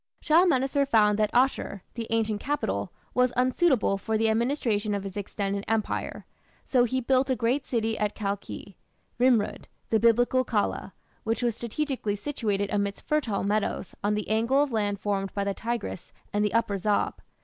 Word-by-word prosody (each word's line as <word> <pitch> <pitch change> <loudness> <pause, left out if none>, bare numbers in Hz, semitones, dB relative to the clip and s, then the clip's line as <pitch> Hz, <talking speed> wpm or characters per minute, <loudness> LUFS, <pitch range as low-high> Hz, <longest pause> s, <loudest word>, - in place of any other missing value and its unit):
Shalmaneser 290 -4 +3
found 215 -5 +3
that 215 -1 +2
Asshur, 245 -6 +1
the 230 -2 -5
ancient 220 -2 0
capital, 290 +1 -2 0.2
was 250 0 +3
unsuitable 255 - +2
for 220 +2 -1
the 220 0 +2
administration 220 -3 0
of 200 - -3
his 195 -2 -7
extended 200 0 -3
empire, 225 -1 -2 0.4
so 250 -2 +3
he 260 +2 -1
built 260 +2 +2
a 260 - +2
great 250 +4 0
city 225 -2 -1
at 210 -1 0
Kalkhi 200 -1 -5 0.4
(Nimrud), 245 -4 +2 0.2
the 220 - +4
Biblical 245 +3 +4
Calah, 220 -4 -1 0.3
which 225 +2 -1
was 235 -3 +1
strategically 240 -2 -2
situated 205 -4 -2
amidst 200 -1 -2
fertile 260 -10 0
meadows 205 -2 -1
on 210 +1 +2
the 210 - -3
angle 230 +6 +3
of 290 - -3
land 205 -3 0
formed 195 -1 -1
by 200 - 0
the 200 0 -1
Tigris 230 -5 -4 0.2
and 205 0 +2
the 210 +1 0
Upper 215 -4 +1
Zab. 205 +2 0
225 Hz, 165 wpm, -27 LUFS, 205-255 Hz, 0.4 s, the